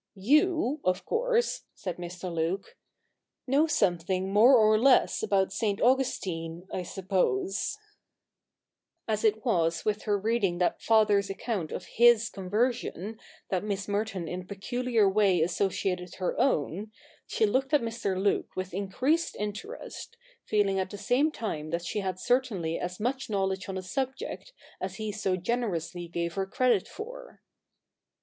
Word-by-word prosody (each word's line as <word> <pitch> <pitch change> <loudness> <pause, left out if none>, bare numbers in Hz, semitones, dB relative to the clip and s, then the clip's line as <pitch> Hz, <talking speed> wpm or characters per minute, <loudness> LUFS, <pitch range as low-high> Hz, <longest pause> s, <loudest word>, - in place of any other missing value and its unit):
You, 300 - +2
of 185 0 0
course,' 475 0 0
said 180 -3 -5
Mr. 180 0 -6
Luke, 170 - -2 0.7
'know 280 +5 +3
something 185 - 0
more 235 +6 +7
or 215 -1 +5
less 260 +2 +4
about 195 -3 +1
St. 205 -3 0
Augustine, 185 -9 0
I - - -1
suppose,' 195 - -1 1.3
As 215 -1 -1
it 220 +1 +2
was 170 -7 +1
with 215 0 0
her 205 -1 +2
reading 205 -3 0
that 180 0 0
Father's 210 -3 +3
account 195 -4 -3
of 180 - -5
his 235 0 +5
conversion 215 +1 -2 0.3
that 185 -1 0
Miss 200 -2 -3
Merton 200 -4 -2
in 180 +2 -4
a - - -13
peculiar 225 +3 0
way 195 -2 +3
associated 180 +1 -1
her 185 - -2
own, 205 - 0 0.4
she 220 - +2
looked 260 +6 0
at 295 - +4
Mr, 225 -5 -2
Luke 200 +1 0
with 185 -1 -4
increased 255 - 0
interest, 210 - -6 0.3
feeling 200 -2 +2
at 190 - -1
the 205 - -7
same 275 +9 +2
time 155 - -4
that 170 +2 -2
she 210 - -2
had 190 -2 -2
certainly 200 -11 0
as 180 0 -4
much 260 +4 -2
knowledge 195 -1 -1
on 190 - -3
the 190 - -4
subject 265 - -4 0.3
as 185 0 -3
he 215 +1 -3
so 195 -2 -1
generously 175 -5 -2
gave 170 0 -3
her 195 0 -2
credit 235 -1 +2
for. - - -9
205 Hz, 145 wpm, -28 LUFS, 185-240 Hz, 1.3 s, more